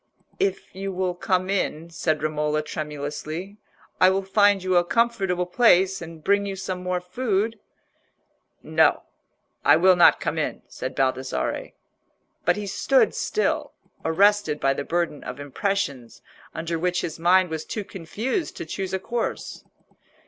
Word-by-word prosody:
"If 195 -1 -1
you 195 +1 -4
will 185 -1 -1
come 185 +1 0
in," 170 -4 -2
said 155 -2 -1
Romola, 150 0 0
tremulously, 155 +5 -5 0.4
"I 185 - +7
will 195 +1 0
find 205 0 +3
you 185 -1 +1
a 175 - +5
comfortable 195 -3 +1
place, 190 -2 +4
and 165 -2 -9
bring 200 +2 +3
you 195 - -3
some 185 -1 -4
more 180 0 -1
food." 210 +3 -1 1.0
"No, - - +3 0.6
I - - +7
will 185 +3 +5
not 175 - +6
come - - -2
in," - - -3
said - - -6
Baldassarre. 130 - -1 0.7
But 175 - +4
he 210 - -4
stood 265 +7 +2
still, 435 - -1 0.3
arrested 195 -2 +3
by 135 0 +2
the 140 - -4
burden 170 -1 -2
of 125 +2 -7
impressions 145 - -3 0.3
under 165 0 -3
which 180 +1 0
his 160 - -5
mind 180 +1 +4
was 160 -1 -3
too 210 - -4
confused 210 - -4
to - - -5
choose 190 +3 -3
a - - -2
course. 235 +5 -4
180 Hz, 150 wpm, -24 LUFS, 160-195 Hz, 1.0 s, I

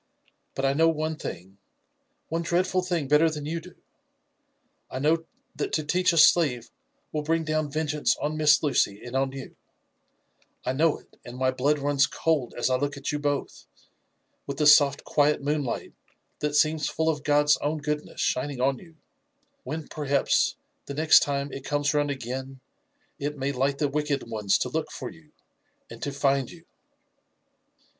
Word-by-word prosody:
But 135 - -1
I 135 - +3
know 165 +3 +4
one 155 0 -1
thing, 95 - -8 0.7
one 165 +1 -2
dreadful 185 +2 +1
thing 175 -5 -2
better 150 +3 +4
than 150 -2 -6
you 165 +3 -2
do 180 +1 -14 0.6
— - - -47
I - - -5
know 160 +4 +1 0.3
that - - -3
to 155 - +1
teach 180 +5 +2
a 170 - -1
slave 145 -7 +4 0.4
will 155 - -2
bring 165 +2 0
down 155 -1 -1
vengeance 150 0 0
on 150 +1 -2
Miss 155 -1 +4
Lucy 120 -8 +1
and 125 +1 -7
on 135 0 +1
you; 135 -1 -9 1.1
I 130 - 0
know 155 +3 +2
it, - - -23
and 120 +1 -9
my 130 0 +2
blood 140 +4 +1
runs 145 0 +2
cold 150 -7 -1
as 120 - +1
I 130 0 +2
look 145 +2 -2
at 140 - -3
you 150 - -2
both, 145 -1 -3 0.8
with 140 -1 -4
the 150 - +1
soft, 145 -1 +6
quiet 150 0 +2
moonlight 145 -3 -2 0.5
that 150 0 -1
seems 155 0 +2
full 160 - -1
of 150 -3 0
God's 145 0 +4
own 150 +2 -2
goodness 150 0 -4
shining 135 +1 -1
on 135 +1 +1
you 165 -3 -16 0.4
— 280 -1 -45
when, 155 0 -5
perhaps, 145 -2 +1 0.3
the 140 - -5
next 155 +2 +6
time 140 0 -2
it 135 - -7
comes 145 +1 0
round 145 -1 +1
again 130 0 -5 0.6
it 145 +1 -3
may 135 +1 -1
light 135 +1 0
the 145 - +1
wicked 145 -1 -1
ones 105 -4 +1
to 125 - -2
look 155 +3 -2
for - - -6
you— 155 -2 -19 0.6
and - - -10
to 145 - -2
find 135 -2 +1
you." 170 -1 -14
145 Hz, 180 wpm, -26 LUFS, 135-155 Hz, 1.1 s, soft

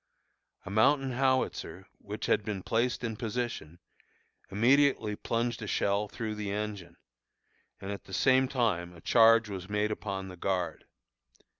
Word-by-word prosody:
A 100 - -7
mountain 135 +5 +3
howitzer, 130 +1 -1
which - - -6
had - - +2
been 100 -4 -4
placed 120 +2 0
in 115 -2 -2
position, 115 -8 -4 0.7
immediately 115 +1 +3
plunged 115 +2 -2
a 105 - -5
shell 100 +1 0
through 110 +1 -5
the 105 -2 -4
engine, 100 -5 -5 0.8
and 95 - -6
at 100 - -7
the - - -14
same 130 +6 +4
time 90 -10 -1
a 85 - -14
charge 115 +1 +5
was 95 -2 -7
made 105 +1 0
upon 100 -2 -4
the 90 -1 -10
guard. 90 -3 -2
105 Hz, 145 wpm, -30 LUFS, 100-120 Hz, 0.8 s, charge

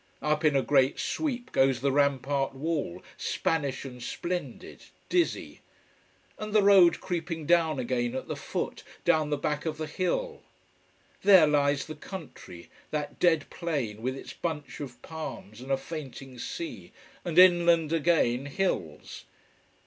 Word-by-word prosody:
Up 150 +1 +1
in 150 -2 +4
a 135 - +3
great 135 -1 +3
sweep 255 -5 -2
goes 135 -2 +3
the 140 +2 +1
rampart 140 -1 +1
wall, 145 - -3
Spanish 140 -5 -1
and 125 -2 -9
splendid, 175 +8 -5 0.2
dizzy. 350 -2 0 0.8
And 215 0 -5
the 210 -2 +5
road 190 -4 +6
creeping 165 -3 -4
down 165 -2 +3
again 120 -1 -1
at 130 - -4
the - - -3
foot, - - -4 0.2
down 155 -1 +3
the 150 - 0
back 150 +2 -2
of 155 -1 -2
the 155 - -3
hill. 320 - -2 0.8
There 190 -5 +8
lies 145 -1 +2
the 155 - -7
country: 150 - -10 0.2
that 150 -1 -4
dead 165 -4 +3
plain 140 - -3
with 130 +2 -2
its - - -9
bunch 160 -4 -5
of 135 -4 -7
palms 155 -8 -7
and 135 +2 -6
a 135 - +3
fainting 135 -3 -8
sea, 335 - -6 0.3
and 170 -2 -4
inland 170 -3 +6
again, 145 -6 +2
hills. 135 - -3
150 Hz, 145 wpm, -28 LUFS, 135-170 Hz, 0.8 s, There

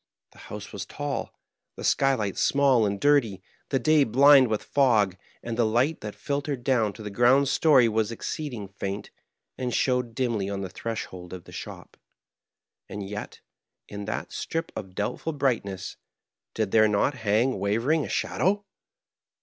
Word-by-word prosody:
The - - -19
house - - -8
was - - -5
tall, 145 -1 -4 0.4
the - - -8
skylight 130 -8 +1
small 135 -6 +3
and 100 0 -3
dirty, 115 -10 +2 0.3
the 135 - +1
day 155 +3 +4
blind 135 +2 +6
with 110 -2 -2
fog; 110 -9 +2 0.3
and 115 -1 -4
the 120 - +2
light 125 +8 +1
that 105 -1 -6
filtered 140 -3 -3
down 120 -6 +2
to 110 - -10
the 105 - -6
ground 130 +5 +4
story 135 -7 +5
was 110 0 0
exceeding 120 -2 -5
faint, 100 +1 -5 0.5
and 125 -1 -2
showed 125 -1 0
dimly 115 -6 -1
on 100 -1 -3
the 95 - -4
threshold 95 -5 -6
of 90 -2 -8
the - - -14
shop. - - -9 0.9
And 100 -1 -6
yet, 105 +1 -7 0.5
in 100 0 -7
that 105 - -4
strip 165 +1 -4
of 95 -1 -7
doubtful 105 +10 -3
brightness, 115 -10 -2 0.6
did 110 -3 -1
there 110 -1 +5
not 105 +7 +1
hang 115 0 +1
wavering 115 +11 +1
a - - -6
shadow 205 +2 0
115 Hz, 160 wpm, -26 LUFS, 105-135 Hz, 0.9 s, blind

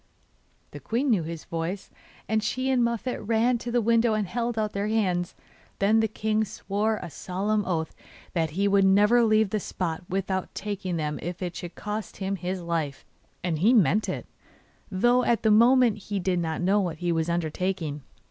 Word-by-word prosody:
The - - -8
queen 250 +4 0
knew 205 -6 +3
his 165 0 -6
voice, 170 +4 -4 0.4
and 220 0 +1
she 255 +5 -1
and 255 -2 +3
Muffette 235 +2 -2
ran 230 +3 +2
to 240 - -5
the 240 -1 +1
window 230 0 +3
and 215 -1 0
held 235 +3 -2
out 215 -1 -1
their 200 +1 -1
hands. 185 -5 0 0.4
Then 210 +3 +3
the 220 - +2
king 215 0 0
swore 215 +1 -1
a - - -6
solemn 205 +6 -1
oath 160 -3 -2 0.4
that 165 -2 0
he 200 +1 +3
would 200 0 +4
never 210 +5 +5
leave 215 -2 +3
the 215 - 0
spot 175 -3 -3
without 190 0 -2
taking 195 -3 -3
them 150 -1 -2
if 175 +2 -5
it 175 -1 -4
should 175 -1 -7
cost 210 +1 -5
him 195 0 -2
his 180 +1 -4
life; 160 -5 -3 0.4
and 170 -4 -1
he 215 +9 +5
meant 215 0 +3
it, - - -4 0.6
though 240 +6 +3
at 235 - +1
the 220 - +4
moment 235 0 +5
he 200 0 -4
did 180 -1 0
not 160 -1 -2
know 195 +3 +3
what 170 -4 -3
he 175 +1 -1
was 165 0 0
undertaking. 170 -2 -2
200 Hz, 190 wpm, -26 LUFS, 175-220 Hz, 0.6 s, never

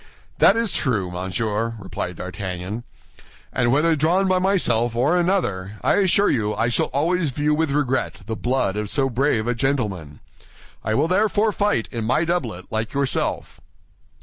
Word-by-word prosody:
"That 200 - +6
is 230 -2 +2
true, 105 - 0
Monsieur," 105 +5 -2
replied 95 -3 -5
D'Artagnan, 95 +4 -5 0.7
"and 120 -2 +2
whether 155 +4 +3
drawn 170 +6 +2
by 185 -1 +2
myself 120 - +1
or 135 +8 +2
another, 170 - 0
I - - +3
assure 200 +1 +3
you 105 -4 0
I 115 - +1
shall 120 - +1
always 160 +4 0
view 145 +3 0
with 160 0 +1
regret 140 -2 -1
the 110 - -3
blood 120 -4 0
of 105 -1 -3
so 135 +1 +1
brave 120 -3 +1
a 120 - +1
gentleman. 105 - -2 0.6
I 110 +1 0
will 145 +6 +2
therefore 210 +3 +2
fight 205 - 0
in 115 -2 -3
my 130 +8 +2
doublet, 120 - -2
like 110 +1 -2
yourself." 140 -1 -1
125 Hz, 160 wpm, -22 LUFS, 110-165 Hz, 0.7 s, That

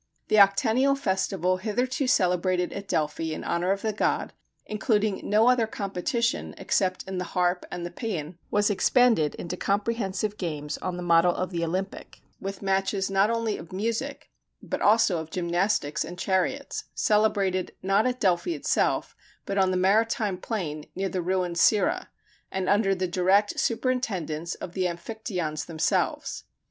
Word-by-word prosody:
The 215 - +4
octennial 240 +7 +4
festival 190 -4 0
hitherto 245 +7 -1
celebrated 180 -3 +2
at 200 0 -6
Delphi 160 -1 -1
in - - -6
honor 175 +2 0
of 195 0 -1
the 220 -1 0
god, 210 - 0 0.3
including 210 -1 0
no 215 +3 +3
other 250 -3 +4
competition 215 +4 -2
except 185 -2 0
in 190 -1 -3
the - - -1
harp 180 0 +1
and 175 - -5
the 175 - -5
pæan, 175 -6 -5
was 205 0 +2
expanded 205 - +3
into 170 +1 -5
comprehensive 205 0 -1
games 150 -4 -4
on 180 -1 -3
the 180 - -5
model 170 0 +4
of 185 0 -2
the 170 -1 -2
Olympic, 185 +4 -4 0.2
with 195 +1 -6
matches 195 0 0
not 195 +2 +3
only 230 -2 -1
of 160 - -11
music, 230 +8 -3 0.3
but - - -5
also 205 -5 +4
of 160 0 -7
gymnastics 175 -2 0
and 175 - -8
chariots 190 +10 -1
celebrated, 200 -3 +1
not 195 +4 +3
at 250 0 -2
Delphi 190 - +1
itself, - - 0 0.3
but 200 0 -1
on 190 -1 +4
the 185 - 0
maritime 210 +1 +2
plain 165 -9 -4
near 195 +1 -1
the 185 0 -2
ruined 180 -1 -1
Cirrha 255 - +3 0.4
and 190 -1 -2
under 200 -1 +3
the 185 0 -1
direct 190 +4 +2
superintendence 210 - -1
of 170 - -8
the 185 -1 0
Amphictyons 175 -4 -4
themselves. 160 -2 -1
195 Hz, 155 wpm, -26 LUFS, 180-215 Hz, 0.4 s, The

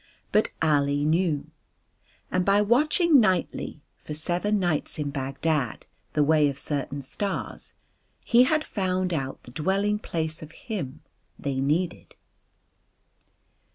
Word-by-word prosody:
But 215 - +3
Ali 145 -2 +2
knew. 160 -2 +1 0.8
And 185 - +2
by 200 +2 +4
watching 295 - +4
nightly, 185 -7 0 0.2
for 150 - -6
seven 175 +7 0
nights 175 -6 0
in 145 -2 -2
Bagdad, 140 -1 -1 0.3
the 150 - +3
way 150 -1 +4
of 140 - -5
certain 140 -1 -3
stars 195 +9 -4 0.5
he 245 +1 +5
had 310 +3 +2
found 185 - -1
out 135 -4 -3
the 125 - -12
dwelling 195 +8 0
place 160 -5 -1
of 155 +1 -10
Him 185 - -5 0.4
they 135 -2 -2
Needed. 165 +6 -1
160 Hz, 120 wpm, -26 LUFS, 145-200 Hz, 0.8 s, he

